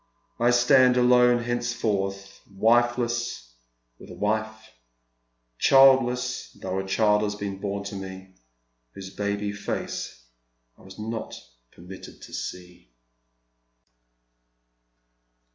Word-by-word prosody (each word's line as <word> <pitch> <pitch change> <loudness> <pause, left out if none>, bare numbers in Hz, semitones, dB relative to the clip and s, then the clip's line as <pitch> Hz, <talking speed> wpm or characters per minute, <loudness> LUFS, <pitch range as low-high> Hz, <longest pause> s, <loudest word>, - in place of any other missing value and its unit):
I 120 +1 +3
stand 125 +1 +5
alone 125 -1 +4
henceforth, 105 -5 -3
wifeless 120 - 0 0.5
with - - -13
a - - -10
wife, 110 +1 -3 0.9
childless 130 -2 +4
though 95 0 -3
a 95 - -5
child 105 +1 +2
lias 105 -1 -2
been 100 -2 -5
born 100 0 -4
to 100 0 -7
me, 95 -1 -9 0.6
whose 95 0 -9
baby 100 0 -2
face 100 -10 -5 0.5
I - - -22
was 95 0 -14
not 110 +1 -5 0.4
permitted 90 +2 -12
to - - -12
Gee." 90 +2 -8
105 Hz, 100 wpm, -25 LUFS, 95-120 Hz, 0.9 s, stand